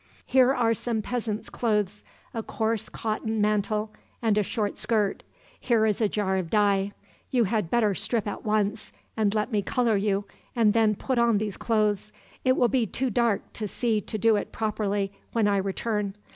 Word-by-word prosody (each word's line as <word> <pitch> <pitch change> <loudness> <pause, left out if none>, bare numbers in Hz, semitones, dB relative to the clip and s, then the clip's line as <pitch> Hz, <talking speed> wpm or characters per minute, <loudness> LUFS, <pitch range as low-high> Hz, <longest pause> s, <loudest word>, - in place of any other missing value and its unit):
"Here 260 0 +5
are 235 -4 +2
some 225 -1 -2
peasant's 225 -3 -3
clothes 210 -3 -1 0.3
a 225 - -2
coarse 220 -1 -2
cotton 220 0 -2
mantle, 210 +1 0 0.3
and 225 -3 +2
a 210 - +3
short 205 0 -2
skirt. 210 -4 0 0.4
Here 230 -3 +2
is 215 0 0
a 215 - +3
jar 190 -2 0
of 180 -3 -3
dye. 200 -1 +2 0.4
You 245 -2 +3
had 210 -4 0
better 215 -2 +2
strip 215 +3 -1
at 205 - -5
once, 215 0 0 0.2
and 215 -1 +1
let 215 +4 0
me 210 -2 +2
color 230 0 +1
you, 200 0 0 0.3
and 220 -3 +4
then 220 -2 +3
put 255 +4 -1
on 235 -2 +4
these 205 -1 -2
clothes. 210 -2 0 0.3
It 255 0 +3
will 245 - +4
be 240 -2 +1
too 255 +5 -2
dark 230 -2 0
to 215 - -3
see 220 0 0
to 215 - -5
do 220 +1 +4
it - - -4
properly, 205 -2 -1 0.2
when 225 -3 +2
I 200 -1 +2
return. 200 +1 -2
215 Hz, 185 wpm, -26 LUFS, 205-230 Hz, 0.4 s, Here